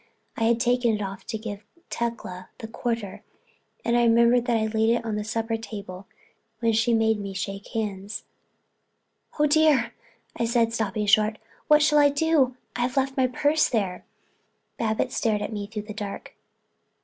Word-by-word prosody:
I 225 - 0
had 230 0 +3
taken 245 -1 +2
it 210 - -4
off 195 +1 -7
to 220 - -3
give 210 -2 -7 0.3
Tecla 210 -6 -4
the 225 - -7
quarter 230 -3 -4 0.6
and 235 - +2
I 240 - +4
remember 235 +1 +5 0.2
I'd 220 -1 0
laid 220 0 +2
it 235 0 +1
on 220 -2 -2
the 210 - -2
supper 225 +1 -2
table 200 -4 -8 0.5
when 230 -1 +2
she 225 +2 +2
made 220 -1 +2
me 200 -1 -5
shake 195 +1 -5
hands. 205 -2 -4 1.1
"Oh 300 - +4
dear!" 295 -6 +4 0.4
I 235 - 0
said, 230 -1 +2
stopping 215 -1 -1
short. 215 +1 +3 0.3
"What 300 0 +6
shall 300 -1 +4
I 290 0 +6
do—I've 265 -4 0
left 270 0 +1
my 260 -1 +3
purse 290 +5 +2
there." 195 -6 -1 0.8
Babbitts 230 +3 -1
stared 215 -3 +1
at - - -4
me 205 -1 -4
through 210 -1 -5
the 215 0 -8
dark. 205 -1 -6
225 Hz, 165 wpm, -25 LUFS, 210-245 Hz, 1.1 s, What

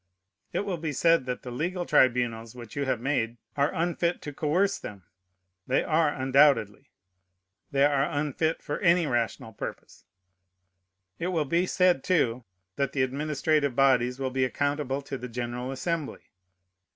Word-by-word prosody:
It - - -1
will 195 -4 -3
be 155 -2 -3
said 165 -2 +3
that 125 - -4
the 125 - -7
legal 175 +8 -2
tribunals 120 -4 +2
which 120 -3 -10
you 140 -1 -1
have 130 - 0
made 120 -3 -1 0.2
are 140 0 +2
unfit 170 +1 -1
to 145 - -6
coerce 175 +8 +1
them. 100 -3 -9 0.6
They 130 - +2
are, 160 -1 +2
undoubtedly. 135 -3 +2 0.8
They 140 0 +3
are 140 -1 +2
unfit 150 +2 -1
for 145 - -3
any 175 -2 +4
rational 115 -3 -2
purpose. - - -8 1.1
It 170 - -1
will 165 -5 0
be 170 +6 +1
said, 180 -7 +3
too, 125 -9 +1 0.3
that 140 -1 -1
the 130 - +2
administrative 145 +1 0
bodies 125 -2 +3
will 135 -1 -2
be 130 0 0
accountable 145 +1 -1
to 135 -1 -6
the 125 - -6
general 120 +2 -4
Assembly. 160 +2 -4
140 Hz, 150 wpm, -27 LUFS, 125-160 Hz, 1.1 s, any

